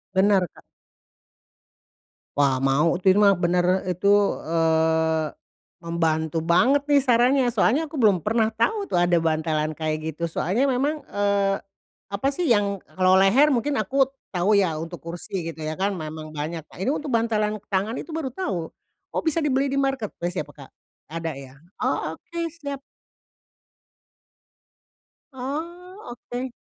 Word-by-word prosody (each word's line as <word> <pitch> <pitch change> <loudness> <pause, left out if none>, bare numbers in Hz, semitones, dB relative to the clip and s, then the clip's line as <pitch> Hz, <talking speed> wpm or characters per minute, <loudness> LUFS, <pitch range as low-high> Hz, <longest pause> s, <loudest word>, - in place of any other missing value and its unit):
Benar 190 -1 +4
Kak. - - -17 1.8
Wah, 135 -2 +2
mau 140 +5 +3
itu 185 +2 +3
ir 195 - +3
mah 200 -1 +6
benar 180 +1 +1
itu, 180 +1 -2 0.4
eee, 160 -1 +2 0.6
membantu 165 -1 0
banget 225 - +3
nih 290 -1 +5
sarannya 250 +1 +3
soalnya 290 +7 +2
aku 300 - -7
belum 205 -7 +4
pernah 225 0 +2
tahu 400 - 0
tuh - - -2
ada 175 0 +3
bantalan 155 -1 0
kayak 155 0 -2 0.2
gitu 170 +2 -3
soalnya 195 - 0
memang, 285 +4 0
eee, 200 -1 +1 0.5
apa 200 +6 -1
sih 340 +4 -2
yang 205 -4 +2 0.2
kalau 185 0 +4
leher 250 +11 +5
mungkin 275 +3 0
aku 270 -1 +2 0.2
tahu 190 +3 +2
ya 180 -6 +2
untuk 165 +2 -6
kursi 175 +2 -5
gitu 160 - -16
ya 155 0 -3
kan 195 +3 0
memang 155 -3 -6
banyak. 155 +2 -4
Nah - - -18
ini 230 +8 0
untuk 295 -3 -4
bantalan 215 -2 0
tangan 200 +4 -1
itu 320 - -7
baru 295 -5 -3
tahu, 190 - -3 0.4
oh, - - -1
bisa 320 0 +1
dibeli 275 -1 +1
di 275 - -2
marketplace 215 -10 -2
ya 150 - -4
pe 145 - -16
Kak? 140 -2 -13 0.4
Ada 165 -2 -4
ya? 135 0 -12 0.2
Oh, - - -1
oke, 340 -2 -5
siap. 285 -4 -6 2.5
Oh, 340 - -6 0.2
oke 250 +1 -3
195 Hz, 150 wpm, -24 LUFS, 165-260 Hz, 2.5 s, mah